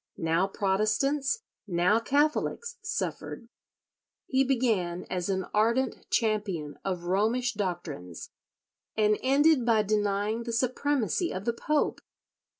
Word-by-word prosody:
Now 165 +3 +1
Protestants, 215 - 0 0.2
now 180 +4 +3
Catholics 305 - 0
suffered. 465 +3 -4 0.8
He 265 0 +2
began 225 -10 0
as 180 0 -2
an 190 -1 0
ardent 235 +5 +1
champion 205 -10 -1
of 180 -3 -2
Romish 220 +7 +1
doctrines, 175 - -5 0.7
and 210 -1 +3
ended 280 +1 +4
by 225 -2 +3
denying 210 +1 0
the 235 0 -4
supremacy 260 - 0
of 190 +2 -5
the 235 - +1
Pope. 300 +5 0
215 Hz, 110 wpm, -28 LUFS, 190-265 Hz, 0.8 s, ended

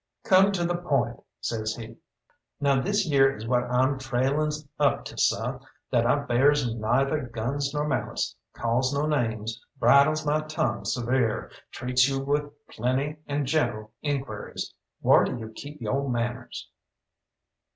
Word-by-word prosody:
"Come 190 +1 +5
to 175 -3 0
the 175 0 0
point," 140 -9 0 0.2
says 110 -1 -2
he. 115 -1 -9 0.6
"Now 140 -2 +3
this 200 +2 +1
yere 135 -2 +4
is 110 +1 -7
what 125 0 +2
I'm 130 +2 +1
trailin's 140 +4 0
up 145 -2 +2
to, - - -8
seh, 125 +4 +1 0.3
that 120 -2 +3
I 125 - +4
bears 140 +1 +3
neither 130 +5 +1
guns 130 +5 -2
nor 150 +1 -1
malice, 145 - -2 0.2
calls 120 +3 0
no 145 +2 +1
names, 115 -6 -1
bridles 155 +3 +5
my 150 +1 +2
tongue 155 +1 -2
severe, 120 -2 0 0.2
treats 125 +1 +2
you 135 0 -1
with 145 +2 0 0.2
plenty 130 +6 -1
and 145 0 -1
gentle 110 -7 0
inquiries, 135 -8 -4 0.3
whar - - +6
do - - -2
you 110 -2 -7
keep 145 +7 -10
yo' 135 +5 -1
manners?" 120 0 -3
135 Hz, 145 wpm, -26 LUFS, 120-145 Hz, 0.6 s, whar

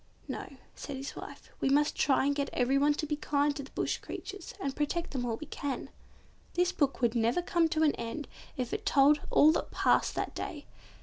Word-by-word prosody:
"No," - - -6 0.2
said 280 -2 -6
his 275 +1 -6
wife, - - -10
"we - - +1
must 295 +2 +3
try 270 -1 +3
and 285 - +3
get 280 0 -1
everyone 275 +4 +3
to 305 - -2
be 300 0 -1
kind 290 -1 +1
to 280 - -4
the 275 - -10
bush - - -1
creatures, 395 -3 -7
and 275 -1 -3
protect 330 +4 -1
them 255 -3 -2
all 225 -1 -1
we 310 - -7
can." 285 -2 -4 0.6
This 355 +1 +3
book 275 -3 0
would 235 -2 +3
never 235 +8 +1
come 340 -2 +2
to 315 -1 +1
an 300 - +5
end 235 +6 -4 0.3
if 250 -2 -2
it 425 - -2
told 295 -5 +5
all 305 - +6
that 325 - -1
passed - - +2
that - - -2
day. 295 -3 -5
285 Hz, 210 wpm, -31 LUFS, 270-310 Hz, 0.6 s, all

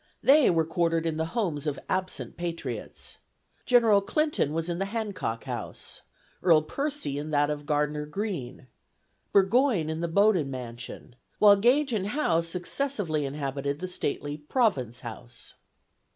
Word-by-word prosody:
They 285 0 +6
were 165 -2 +2
quartered 165 0 0
in 160 -1 -1
the 160 0 -1
homes 160 -9 -1
of 145 -2 -1
absent 185 0 -2
patriots. 165 -9 -5 0.5
General 230 -5 +5
Clinton 300 - 0
was 165 +1 -2
in 175 0 -2
the 195 - 0
Hancock 200 - -3
House, - - -6 0.4
Earl 165 -4 +5
Percy 275 - -3
in 150 +1 -5
that 145 0 +2
of 145 0 -5
Gardner 150 0 0
Greene, 150 - -4 0.7
Burgoyne 200 - +3
in 160 +1 -4
the 170 - 0
Bowdoin 185 -4 +3
mansion; 120 -2 -8 0.2
while 205 -1 +7
Gage 250 +6 +3
and 200 -3 0
Howe 205 - +1
successively 175 - -2
inhabited 140 0 -3
the 185 +4 -5
stately 145 -4 -3
Province 145 - 0
House. 120 0 -9
165 Hz, 140 wpm, -27 LUFS, 145-205 Hz, 0.7 s, while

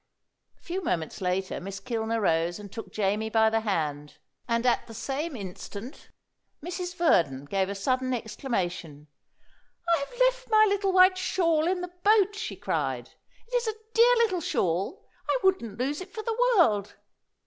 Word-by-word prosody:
A - - -33
few 365 +2 -4
moments 165 - -2
later 185 +1 -1
Miss 195 +2 -6
Kilner 225 +1 -2
rose 170 -3 +1
and 205 -2 -10
took 225 - -8
Jamie 210 +1 0
by 220 0 +3
the 225 - +2
hand; 150 -9 -2 0.3
and 235 0 0
at 245 - +2
the 225 - -10
same 285 +6 -3
instant 200 - -8 0.6
Mrs. 355 0 -4
Verdon 160 - +2
gave 190 +5 0
a 200 - -3
sudden 255 +6 0
exclamation. 180 - -3 0.8
"I 335 - +3
have 280 - -7
left - - +2
my 435 -1 +6
little 400 -1 +1
white 370 0 +6
shawl 335 -4 +1
in 365 0 0
the 360 0 -6
boat!" 415 -1 +4
she 420 - -5
cried. - - -2 0.4
"It's - - 0
a 435 - -1 0.2
dear 475 +2 +6
little 440 -7 +2
shawl. 185 - -1 0.2
I - - +3
wouldn't 235 - +1
lose 280 +6 -2
it 370 +1 -9
for 435 - -6
the 485 +2 +2
world." 210 - +3
250 Hz, 165 wpm, -27 LUFS, -, 0.8 s, my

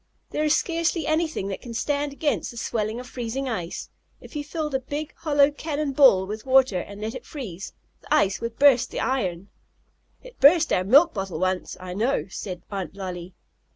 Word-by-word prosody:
"There 305 - -1
is 305 0 +4
scarcely 335 -1 0
anything 315 - 0
that 195 - -5
can 235 -2 -8
stand 290 +3 -1
against 290 +1 -1
the 235 - -10
swelling 220 0 -2
of 250 - -8
freezing 250 +2 -4
ice. 180 -9 -4 0.3
If - - -14
you 295 - -2
filled 305 -1 -4
a 265 - +2
big, 290 +4 -5
hollow 290 -2 +3
cannon 295 -1 -3
ball 260 -9 +6
with 215 +2 -6
water, 260 -7 +4
and 200 +3 -8
let 220 +2 -4
it - - -7
freeze, 205 - -7 0.3
the - - -18
ice 195 0 +3
would 230 0 -4
burst 260 -4 +5
the - - -4
iron." 195 -8 -1 0.7
"It - - -14
burst 315 +3 +6
our 180 - +2
milk 285 - +6
bottle 190 -4 -4
once, 185 +1 -1
I 180 0 -7
know," 230 +8 0
said 185 -1 -6
Aunt 195 -1 -4
Lolly. 180 -2 -6
250 Hz, 190 wpm, -25 LUFS, 195-290 Hz, 0.7 s, ball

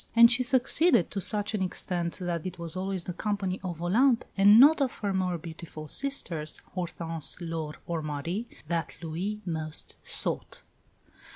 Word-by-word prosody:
And 235 +1 +8
she 250 +1 +3
succeeded 260 - +4
to 195 - -3
such 210 +3 +2
an 210 - -1
extent 175 -2 -3
that 175 -3 -3
it 185 0 -7
was 170 0 -5
always 190 -1 -2
the 180 - -5
company 200 -1 -2
of 175 -3 -5
Olympe, 230 +7 +3
and 205 +2 +7
not 290 +3 +7
of 265 -2 0
her 200 -2 -2
more 185 -2 0
beautiful 160 -1 -9
sisters, 170 - 0
Hortense, 165 -3 -2
Laure, 165 -3 -5
or 170 -2 -3
Marie, 155 +9 -4 0.2
that 165 -2 -3
Louis 185 +7 -4
most 160 -3 -4
sought. - - -1
180 Hz, 160 wpm, -28 LUFS, 165-210 Hz, 0.2 s, And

